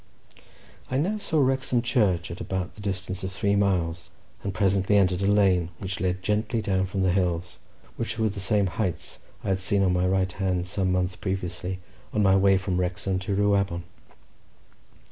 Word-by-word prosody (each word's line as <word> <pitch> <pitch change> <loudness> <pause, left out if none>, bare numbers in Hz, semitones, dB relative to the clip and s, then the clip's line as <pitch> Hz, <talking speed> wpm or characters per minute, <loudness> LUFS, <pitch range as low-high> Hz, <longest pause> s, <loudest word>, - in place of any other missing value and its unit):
I 130 - 0
now 195 +9 0
saw 160 -6 0
Wrexham 130 -2 +1
Church 100 -9 +1
at 85 - -7
about 95 -1 -3
the 105 - -12
distance 95 -1 -3
of 95 - -3
three 100 +1 +1
miles, 90 -5 0 0.3
and 100 - -3
presently 100 0 +2
entered 95 -1 +3
a 100 - +1
lane 95 -4 +3
which 95 -1 -5
led 90 0 -1
gently 110 +3 0
down 95 -3 0
from 95 0 -1
the 95 - +3
hills, 90 -2 -1 0.4
which 110 -1 -3
were 110 -1 +2
the 100 0 -6
same 100 +1 +2
heights 95 -1 -3 0.2
I - - -2
had 95 -1 +1
seen 100 +1 +2
on 90 -1 +3
my 90 0 +2
right 95 0 +1
hand, 90 -1 -1
some 95 0 -1
months 90 0 0
previously, 95 -1 -4 0.3
on 105 - +2
my 95 -1 +5
way 95 0 +5
from 95 -1 -1
Wrexham 90 +1 -1
to 100 +1 -2
Rhiwabon. 100 -3 +1
95 Hz, 185 wpm, -26 LUFS, 90-100 Hz, 0.4 s, my